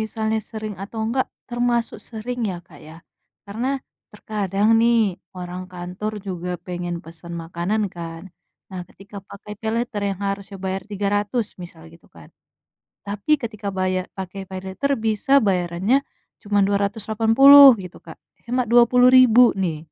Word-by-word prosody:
misalnya 220 0 -2
sering 215 -1 -5
atau 215 +3 -8
enggak, 255 +3 0 0.2
termasuk 240 -2 -1
sering 245 +2 -5
ya, 180 - -5
Kak, 155 -5 -16
ya, 155 - -12 0.5
karena 225 +6 -3 0.4
terkadang 205 -1 -1
nih 235 0 +4 0.4
orang 180 0 -6
kantor 180 +4 -5
juga 180 -1 -4 0.2
pengen 175 -1 -4
pesen 165 +1 -11
makanan 175 +6 -2
kan. 165 -1 -7 0.5
Nah 185 -1 -6
ketika 200 +1 -14
pakai 205 +1 -10
paylater 225 -1 -2
yang 190 - -9
harusnya 195 0 -4
bayar 190 0 -2
Rp300.000 205 +3 -1 0.2
misal 170 -2 -12
gitu 165 - -19
kan, 80 -2 -15 0.8
tapi 205 +8 -4
ketika 215 -3 -6
bayar 185 0 0
pakai 190 +1 -6
paylater 190 +9 -3
bisa 220 +4 -1 0.2
bayarannya 180 +5 +1 0.5
cuman 205 -1 +1
Rp280.000 225 +7 +6 0.2
gitu 180 - -10
Kak, 160 - -10 0.3
hemat 250 +1 0
Rp20.000 250 0 +6 0.2
nih. 165 -4 -1
205 Hz, 135 wpm, -22 LUFS, 180-225 Hz, 0.8 s, Rp280.000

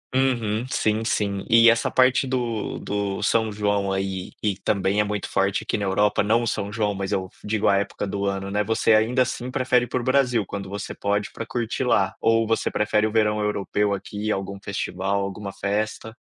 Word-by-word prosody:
Uhum, 120 -4 +1
sim, 110 +1 +1
sim, 100 -3 -1
e 115 -1 +7
essa 115 - +2
parte 130 +1 +4
do 120 -4 -2
do 100 0 -3
São 110 +1 +2
João, 100 -1 0
aí, 95 -1 -3
e 105 -3 0
também 100 0 0
é - - +5
muito 105 -1 -3
forte 95 0 0
aqui - - -1
na 100 - -2
Europa, 105 +2 +2
não 115 +3 +3
o 120 - -2
São 100 -2 -2
João, 105 -2 0
mas, 95 0 -4
eu 95 -1 -1
digo 105 0 0
a 100 - +4
época 100 0 -2
do 100 +1 -2
ano, 100 0 -2
né. 105 +1 0
Você, 110 +1 +2
ainda 120 +4 +2
assim, 125 0 -2
prefere 125 -2 +2
ir - - -13
para 125 +2 -2
o - - -6
Brasil, 125 -4 +2
quando 100 -1 -5
você 100 +1 -6
pode, 100 0 -1
pra 115 - -6
curtir 115 -1 -2
lá - - +2
ou 115 -1 +2
você 115 - 0
prefere 105 0 +1
o 110 - -1
verão 105 -1 +2
europeu 105 0 0
aqui, 105 +2 -4
algum 100 0 -3
festival, 100 0 -2
alguma 100 0 -5
festa? 105 +3 -3
105 Hz, 205 wpm, -24 LUFS, 100-115 Hz, -, e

